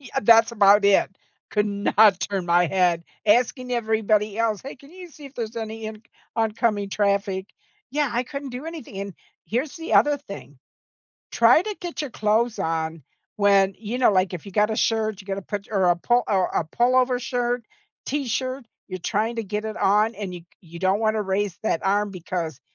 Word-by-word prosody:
Yeah, 260 -4 -4
that's 225 +1 +6
about 205 -1 +5
it. 200 -1 +4 0.4
Could 210 0 +1
not 200 -1 +3
turn 195 -3 -2
my 175 +1 +4
head. 175 -2 +1 0.2
Asking 250 +3 +2
everybody 215 -2 0
else, 225 -3 0
"Hey, 275 - -8
can 275 +3 -17
you 365 -1 -11
see 295 -1 -14
if 275 - -15
there's 230 -1 -5
any 220 0 -5
inc 215 0 -8 0.3
oncoming 220 -2 0
traffic?" 200 -2 0 0.4
Yeah, 290 0 0
I 240 +1 0
couldn't 275 +1 -7
do 250 +6 -7
anything, 310 -12 -8
and, 200 -2 -6 0.3
here's 265 - -2
the 330 0 -3
other 290 0 +5
thing. 200 - -11 0.7
Try 235 +8 +5
to 420 0 -5
get 345 -3 -5
your 290 - -5
clothes 220 +2 0
on 160 -1 -2 0.3
when, 200 -2 +4
you 225 +3 -4
know, 245 -5 +4
like, 185 0 +2
if 175 - -8
you 195 - -9
got 210 +3 +2
a 220 - -2
shirt, 220 -3 0
you 190 - -14
gotta 195 0 -4
put 205 +1 -5
y 210 - -2
or 190 - +3
a 175 - +3
pull 240 +7 +2
or 190 -3 +2
a - - -1
pullover 250 +7 +2
shirt, 245 -1 -2 0.4
t-shirt, 260 -1 -2 0.2
you're 185 -1 -5
trying 220 +6 -1
to 230 - -1
get 210 +2 -4
it 220 0 -5
on, 210 +3 +2
and 200 -4 -6
you 175 - -8
c 170 - -23
you 170 -2 -12
don't 190 +3 +1
wanna 215 -1 +1
raise 195 -1 -2
that 165 - 0
arm 205 +1 +1
because, 170 -5 -5
215 Hz, 200 wpm, -24 LUFS, 195-240 Hz, 0.7 s, that's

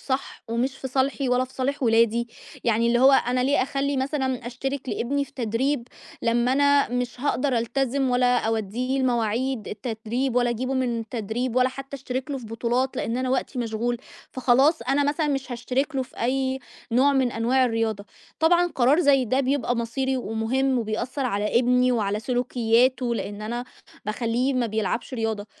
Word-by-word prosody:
صح 265 0 -3
ومش 250 +4 -1
في 265 - -5
صالحي 270 +1 0
ولا 250 +1 +2
في 255 - -16
صالح 275 +2 -2
ولادي، 230 0 +3 0.4
يعني 230 0 +2
اللي 240 +1 +3
هو 270 +1 +7
أنا 250 -1 +3
ليه 270 +1 +2
أخلّي 275 +1 -1
مثلًا 260 -3 -1
أشترِك 270 +2 -4
لابني 280 +5 -1
في 275 - -20
تدريب 245 +2 -1 0.3
لمّا 240 +2 +2
أنا 285 +1 +4
مش 245 -1 -3
هاقدر 270 -2 +1
ألتزم 265 +3 0
ولا 245 0 +3
أودّيه 225 +4 -1
المواعيد 240 -1 0
التدريب 230 +3 -3
ولا 245 -1 +3
أجيبه 255 +3 -2
من 245 -3 0
التدريب 225 +2 -3
ولا 255 0 +4
حتّى 270 +1 -8
أشترِك 260 +1 -4
له 275 - -2
في 235 - -10
بطولات 240 +4 -1
لإن 230 +2 -2
أنا 255 0 -1
وقتي 260 0 -1
مشغول، 235 +1 -1 0.4
فخلاص 265 +5 +3
أنا 280 +2 +1
مثلًا 300 +1 0
مش 270 -2 -2
هاشترِك 260 +5 -2
له 265 - +1
في 255 - -12
أي 265 +1 0 0.3
نوع 265 +4 +4
من 260 -3 +2
أنواع 245 +3 +2
الرياضة. 225 -4 -1 0.4
طبعًا 345 +2 +4
قرار 270 +7 +4
زي 275 -5 +4
ده 255 +3 +1
بيبقى 260 -3 0
مصيري 260 +3 -1
ومهم 250 +3 0
وبيأثّر 240 +5 -2
على 210 +1 +1
ابني 250 +1 +3
وعلى 210 -3 0
سلوكيّاته 245 0 +1
لإن 205 -2 -5
أنا 240 +3 -3 0.4
باخلّيه 235 +4 0
ما 245 -2 +1
بيلعبش 220 +3 -2
رياضة. 220 -3 -2
250 Hz, 170 wpm, -24 LUFS, 230-265 Hz, 0.4 s, هو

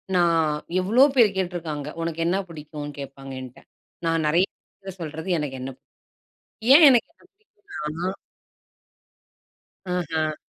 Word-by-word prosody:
நான் 170 -2 +4 0.4
எவ்ளோ 225 +8 +5
பேரு 235 -5 +6
கேட்டுருக்காங்க, 165 -6 -3
"உனக்கு 165 0 -3
என்ன 180 +3 +2
பிடிக்குனு 150 -2 -8
கேப்பாங்க?" 135 -1 -8
என்கிட்ட 125 -1 -11 0.5
நான் 165 -1 +1
நெறய 170 +5 +4
பேருட்ட 195 -1 -13
சொல்றது 160 +3 -6
எனக்கு 145 -3 -3
என்ன 130 - -4
பிடிக்கும். - - -54 0.8
ஏன் 315 +1 +9
எனக்கு 245 -3 +4
என்ன - - -27
பிடிக்கும்னா? 195 - -6 1.7
அஹ. 160 -4 -1
165 Hz, 120 wpm, -24 LUFS, 150-190 Hz, 1.7 s, ஏன்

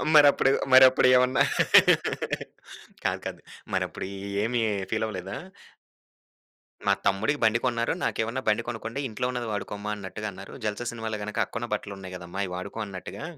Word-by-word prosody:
మరప్పుడు, 145 -2 +7 0.2
మరప్పుడు 130 0 +8
ఏమన్నా 125 +1 +3 1.6
కాదు. - - 0
కాదు. - - -5 0.3
మరప్పుడు - - -2 0.4
ఏమి 120 +1 0 0.3
ఫీల్ 110 - 0
అవ్వలేదా? 95 -2 -5 1.5
మా - - +5
తమ్ముడికి 110 +9 +1
బండి 110 +1 +4
కొన్నారు. 120 -2 +1
నాకేమన్నా 115 +4 -1
బండి 110 +2 +3
కొనుక్కోండి. 115 +2 -4
ఇంట్లో 115 +2 -2
ఉన్నది 125 -1 -3
వాడుకోమ్మా 105 0 -4
అన్నట్టుగా 105 +2 -6
అన్నారు. 95 +1 -11
'జల్సా' 110 +3 -2
సినిమాలో 110 -2 -4
గనక 105 0 -5
అక్కకున్న 120 +1 -5
బట్టలు 105 -1 -5
ఉన్నాయి 95 -1 -8
కదమ్మా 90 +2 -6
అయి 95 - -5
వాడుకో 95 +5 -6
అన్నట్టుగా, 95 - -8
110 Hz, 140 wpm, -27 LUFS, 100-120 Hz, 1.6 s, మరప్పుడు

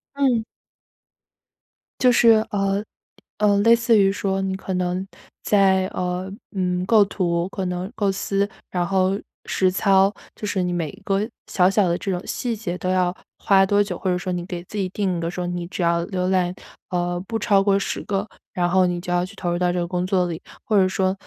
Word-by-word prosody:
嗯。 260 -5 +2 1.6
就 250 -1 +5
是， 230 0 +5 0.2
呃， 195 0 0 0.6
呃， 205 -1 +4
类 230 +3 +6
似 230 -1 +3
于 195 -1 +5
说 195 -1 -1
你 190 0 -1
可 190 0 -5
能 180 +1 -1 0.4
在， 190 -2 +3
呃， 180 +1 -3 0.2
嗯， 180 -1 0
构 215 +1 +6
图 175 -3 -1
可 195 -1 -4
能 180 +2 -3
构 205 -5 0
思， 195 +1 -1 0.2
然 175 -1 0
后 190 +1 +1 0.3
实 185 - +2
操， 195 +1 +3 0.2
就 210 - -6
是 190 -2 0
你 180 - -1
每 170 -3 -2
一 - - -16
个 200 +1 0 0.2
小 180 -1 +4
小 195 -2 +2
的 170 - +1
这 195 - -5
种 180 -2 -2
细 240 -2 -2
节 185 -5 -4
都 185 - -3
要 180 -1 +2 0.3
花 195 -1 +4
多 205 +1 +3
久？ 190 -4 -5
或 190 - -1
者 180 - +1
说 180 +1 -4
你 175 -1 -3
给 175 -1 -6
自 210 - -9
己 195 -2 0
定 190 -4 -1
一 - - -3
个 165 0 -2
说， 180 0 -4
你 175 -1 -4
只 180 - -3
要 170 0 +2
浏 185 -1 -2
览， 185 -1 +1 0.3
呃， 175 0 -1
不 225 - -2
超 205 -2 +3
过 195 0 +3
10 200 - -3
个， 200 0 -1 0.3
然 175 -3 0
后 185 +1 +4
你 175 -1 -1
就 175 - -5
要 175 0 +1
去 185 - -13
投 175 -2 -2
入 175 - -1
到 180 0 +2
这 - - -2
个 175 - 0
工 180 +1 -2
作 185 -1 +2
里。 165 -2 -5 0.2
或 215 - +1
者 190 -1 +5
说， 185 0 0
190 Hz, 230 characters per minute, -22 LUFS, 180-200 Hz, 1.6 s, 类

